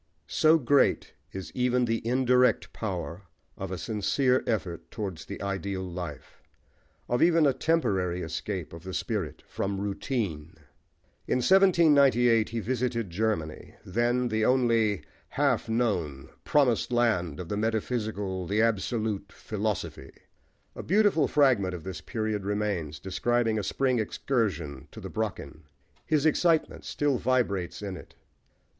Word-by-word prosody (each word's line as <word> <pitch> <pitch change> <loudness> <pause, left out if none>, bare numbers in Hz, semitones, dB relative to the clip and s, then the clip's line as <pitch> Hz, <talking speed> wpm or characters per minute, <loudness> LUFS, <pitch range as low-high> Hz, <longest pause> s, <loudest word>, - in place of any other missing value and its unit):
So 160 +1 +4
great 140 -1 +2 0.2
is 95 -1 -7
even 125 0 +2
the 115 -1 -1
indirect 125 0 +3
power 90 -4 -4 0.3
of 95 - -5
a 95 - -4
sincere 125 - +1
effort 95 -7 -2
towards 95 -6 -5
the - - -7
ideal 100 -1 -3
life, 85 -6 -7 0.7
of 120 - 0
even 165 -2 +5
a 140 - +4
temporary 95 - 0
escape 80 +2 -4
of 85 - -9
the 95 +1 -6
spirit 100 - -3
from 100 0 -3
routine. 100 - -3 0.7
In - - +2
1798 140 - +5
he 115 - -3
visited 120 -4 -2
Germany, 85 -5 -2
then, 120 +5 +1
the 110 0 0
only 115 -5 +2 0.2
half - - 0
known, 90 - -1 0.2
"promised 125 -5 +2
land," 110 -11 +1
of 90 - -6
the 105 - -2
metaphysical, 105 -4 -2
the 105 +4 0
"absolute," 110 -2 0
philosophy. 105 -10 -4 0.6
A - - -5
beautiful 200 -5 +3
fragment 120 -11 +3
of 85 - -8
this 95 0 -6
period 110 -3 -3
remains, 100 -7 -2
describing 115 +4 0
a - - -3
spring 130 +4 +1
excursion 85 - -2
to - - -10
the - - -8
Brocken. 75 +2 -4 0.4
His 155 -2 +2
excitement 160 +1 +2
still 145 -4 0
vibrates 105 -8 0
in 100 -2 -4
it. 85 - -12
110 Hz, 130 wpm, -28 LUFS, 95-125 Hz, 0.7 s, even